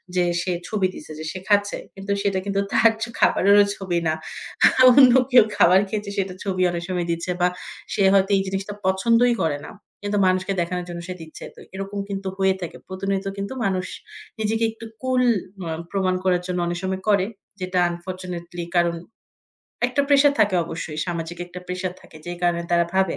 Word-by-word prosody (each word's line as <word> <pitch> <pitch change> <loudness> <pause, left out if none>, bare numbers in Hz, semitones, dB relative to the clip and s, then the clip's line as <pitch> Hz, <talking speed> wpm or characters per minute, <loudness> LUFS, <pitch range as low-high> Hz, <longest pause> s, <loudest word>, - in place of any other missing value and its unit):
যে 180 - +3 0.2
সে 185 - -2 0.2
ছবি 200 -4 +1
দিছে - - -10
যে - - -5
সে 185 - -6
খাচ্ছে। 205 -1 +2 0.2
কিন্তু 195 +1 -5
সেটা 195 -2 0
কিন্তু 200 0 -1
তার 230 - +5
জ - - +1 0.2
খাবারেরও 200 +1 +5
ছবি 180 -3 -1
না। 155 - +2 0.8
অন্য 255 -1 +8 0.2
কেউ 245 -2 +8
খাবার 180 +2 +6
খেয়েছে, 210 0 -3
সেটার 190 -2 -2
ছবি 185 -2 -1
অনেক 170 0 -4
সময় 180 -2 -1
দিচ্ছে। 170 +2 -2
বা 180 - +5 0.5
সে 200 - +1
হয়তো 195 0 +3
এই - - +1
জিনিসটা 195 +2 -3
পছন্দই 230 +6 +3
করে 155 -3 0
না - - -9 0.3
কিন্তু 205 0 -1
মানুষকে 185 +1 +1
দেখানোর 180 +1 -3
জন্য 170 0 -5
সে 185 - -4
দিচ্ছে। 160 -1 -11
তো - - -15 0.2
এরকম 195 +1 -5
কিন্তু 195 -1 -4
হয়ে 190 -1 +3
থাকে 175 - -6
প্রতিনিয়ত 195 +1 -2
কিন্তু 200 +4 -4
মানুষ 185 -2 -1 0.5
নিজেকে 220 +1 0
একটু 225 +1 -11 0.2
কুল 255 -1 +1 0.5
আ - - -2 0.2
প্রমাণ 190 -2 +1
করার 180 -2 +2
জন্য 180 -1 -2
অনেক 175 0 -2
সময় 190 0 -2
করে। 200 -2 +3 0.3
যেটা 185 0 0
unfortunately 175 -1 -6
কারণ 170 -1 +3 0.9
একটা 255 +3 0
প্রেশার 285 0 +5
থাকে 205 -2 +3
অবশ্যই 165 -2 -6
সামাজিক 170 -1 -4
একটা 180 +1 -9
প্রেশার 180 0 -3
থাকে, - - -16
যেই 175 0 -5
কারণে 175 -1 +1
তারা 170 0 +4
ভাবে 190 -3 +2
190 Hz, 185 wpm, -23 LUFS, 175-200 Hz, 0.9 s, অন্য